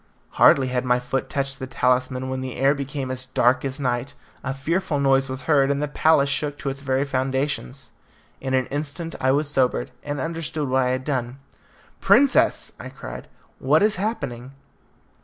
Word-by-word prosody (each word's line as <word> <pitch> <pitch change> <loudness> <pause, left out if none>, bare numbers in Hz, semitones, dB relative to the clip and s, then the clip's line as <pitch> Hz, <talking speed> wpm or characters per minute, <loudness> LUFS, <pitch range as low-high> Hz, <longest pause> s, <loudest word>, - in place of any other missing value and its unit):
Hardly 130 -2 +6
had 125 0 -1
my 125 -1 +2
foot 125 +2 -3
touched 135 -1 -2
the 130 - -5
talisman 130 0 0
when 130 0 -3
the 130 -1 -5
air 135 +2 +3
became 140 -1 -4
as 130 0 -3
dark 130 0 +2
as 135 +1 -4
night, 125 +1 -2 0.3
a 135 - -2
fearful 150 +3 -1
noise 135 -1 +3
was 130 +1 -5
heard, 140 -3 +3
and 140 0 0
the 150 - -1
palace 145 -1 +3
shook 145 +1 -2
to 140 - -3
its 135 0 -6
very 135 0 0
foundations. 130 - -2 0.5
In 130 0 -1
an 130 -1 +1
instant 150 +3 -4
I 130 - +2
was 145 +3 +2
sobered, 125 - 0
and 145 -1 -4
understood 160 -2 -3
what 130 +1 +2
I 125 - +1
had 130 +1 -1
done. 130 -3 -2 0.6
"Princess!" 280 -1 +4
I - - -7
cried, - - -9 0.3
"what - - +3
is 210 -1 +2
happening?" 140 - -4
135 Hz, 180 wpm, -23 LUFS, 130-145 Hz, 0.6 s, Hardly